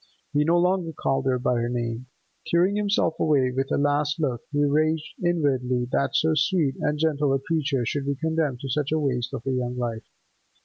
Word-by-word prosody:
He 145 +1 +3
no 165 +3 +3
longer 180 -1 +1
called 135 -1 -1
her 130 -1 +2
by 125 0 0
her 120 0 -1
name. 120 0 -3 0.4
Tearing 180 +4 +2
himself 205 -5 +1
away, 135 -5 +2
with 135 +1 -2
a - - +2
last 145 +2 +1
look, 130 -7 -1
he 145 0 +2
raged 155 +2 +1
inwardly 130 -8 +1
that 140 - 0
so 160 0 +3
sweet 155 -2 +1
and 150 0 0
gentle 150 -2 +1
a - - 0
creature 140 -4 -1
should 140 +3 -2
be 140 - 0
condemned 160 -4 -1
to 135 - -5
such 145 +2 -1
a 155 - +2
waste 125 -5 -1
of - - -5
her 135 - -1
young 125 -1 -2
life. 115 -2 -4
145 Hz, 205 wpm, -25 LUFS, 125-160 Hz, 0.4 s, He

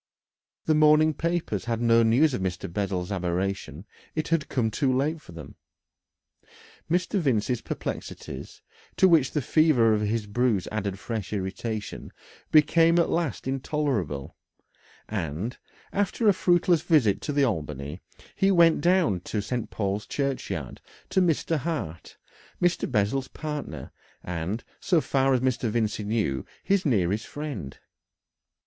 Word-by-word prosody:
The 155 - +3
morning 155 +1 +5
papers 165 - -2
had 115 -1 -1
no 115 -1 +4
news 125 +7 +4
of 110 - -2
Mr. 90 -1 -3
Bessel's 95 -2 -2
aberration 90 -2 -2 0.3
it 155 -1 -2
had 165 -3 0
come 115 -4 0
too 135 +4 +1
late 150 +5 0
for - - -14
them. 80 -4 -10 1.3
Mr. 180 +4 +1
Vincey's 125 - 0
perplexities, - - -6 0.3
to 190 - +6
which 160 -7 +4
the 150 - 0
fever 145 -6 +4
of 105 - +1
his 105 +1 -1
bruise 105 -2 0
added 100 -3 -2
fresh 105 -3 -5
irritation, 105 +2 -4 0.4
became 165 +2 +5
at 170 - +2
last 165 -6 -1
intolerable, 130 - -2 0.7
and, 95 - -4 0.3
after 205 +3 0
a 205 - +7
fruitless 175 -2 +3
visit 115 - +3
to - - -3
the 145 -1 +2
Albany, 75 - -2 0.4
he 195 - +3
went 170 -4 +5
down 175 - +3
to 105 +4 -4
St. 115 +3 -3
Paul's 100 0 -2
Churchyard 125 - -3 0.3
to 190 - +3
Mr. 165 -1 +1
Hart, 140 - -5 0.4
Mr. 175 -5 +1
Bessel's 125 +4 +1
partner, 145 - -6 0.3
and, 90 +6 -3 0.2
so 175 -4 +2
far 135 -2 +2
as 125 - 0
Mr. 130 -2 0
Vincey 110 -1 -1
knew, 105 - -1 0.2
his 195 -4 +1
nearest 105 -3 +1
friend. 145 - -6
120 Hz, 135 wpm, -26 LUFS, 100-155 Hz, 1.3 s, a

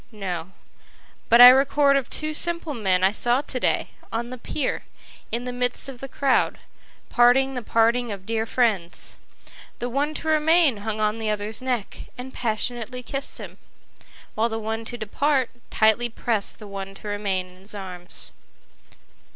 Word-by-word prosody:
—No; 185 -5 -5 0.8
But 235 +1 +7
I 245 - +13
record 275 +2 +4
of 275 -3 0
two 310 0 -1
simple 335 -1 +2
men 190 -6 +1
I 190 - +5
saw 240 +4 +1
to 270 -3 -2
day, - - 0 0.2
on 235 +2 -3
the 255 - -6
pier, 265 +3 -2 0.5
in 235 +2 -1
the 250 0 -4
midst 245 +2 -1
of 255 -3 -9
the 270 - -6
crowd, 270 0 +1 0.5
parting 260 +2 +4
the 250 - -3
parting 230 +1 +2
of 195 -2 -7
dear 225 +1 -1
friends; 210 -10 -1 0.6
The 245 - -3
one 290 +5 -1
to 320 - -5
remain 315 -3 +4
hung 215 +1 -4
on 215 +1 0
the 220 -1 -2
other's 210 +2 0
neck, 250 -5 -3
and 255 +1 -7
passionately 240 +2 -2
kiss'd 275 +2 -3
him, - - -8 0.7
While 225 +2 +1
the 225 - -3
one 225 +1 -4
to 240 - -6
depart, 260 +4 0 0.2
tightly 220 +2 +3
prest 225 -2 -1
the 215 - -11
one 195 -1 -7
to 210 - -10
remain 200 -3 -2
in 180 - -18
his 195 +3 -7
arms. 180 -3 -8
235 Hz, 165 wpm, -24 LUFS, 210-260 Hz, 0.8 s, I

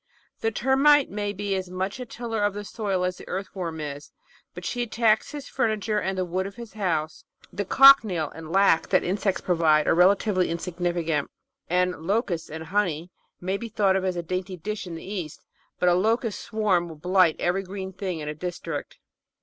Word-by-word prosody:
The 225 - +1
Termite 270 +5 +4
may 205 0 -2
be 205 0 -3
as 190 -1 -2
much 190 +6 -3
a 250 - -6
tiller 225 -2 -3
of 205 -1 +1
the 205 0 -5
soil 195 -4 -2
as 180 0 -2
the - - -12
Earthworm 180 -3 -4
is, 145 -1 -6 0.4
but - - -8
she 245 - -2
attacks 225 -2 +2
his 290 -2 -7
furniture 215 -1 0
and 190 -1 -2
the 185 - 0
wood 185 +2 -2
of 200 - -10
his 235 -3 -10
house; 165 -7 -2 0.3
the 205 - -2
cochineal 215 - +6
and 160 0 -9
"lac" 195 -3 +4
that - - +3
insects 195 +1 -1
provide 160 -4 +3
are - - +5
relatively 185 +2 +3
insignifi 175 0 -2
cant; 150 -3 0 0.4
and 180 +1 +2
"locusts 195 -6 0
and 160 +1 -6
honey" 175 -2 -1 0.3
may 190 +2 -2
be 230 +2 -6
thought 200 -3 +2
a 185 -2 -1
dainty 185 +2 -4
dish 210 +3 -5
in 170 - -6
the 165 - -9
East, 185 -6 -6 0.3
but 180 - +1
a 175 - +6
locust 220 +4 +1
swarm 195 -6 0
will 160 - -9
blight 180 +1 +3
every 180 +3 0
green 190 0 -7
thing 185 -3 -4
in 150 - -6
a 150 - -2
district. 165 -2 -5
190 Hz, 190 wpm, -25 LUFS, 175-210 Hz, 0.4 s, cochineal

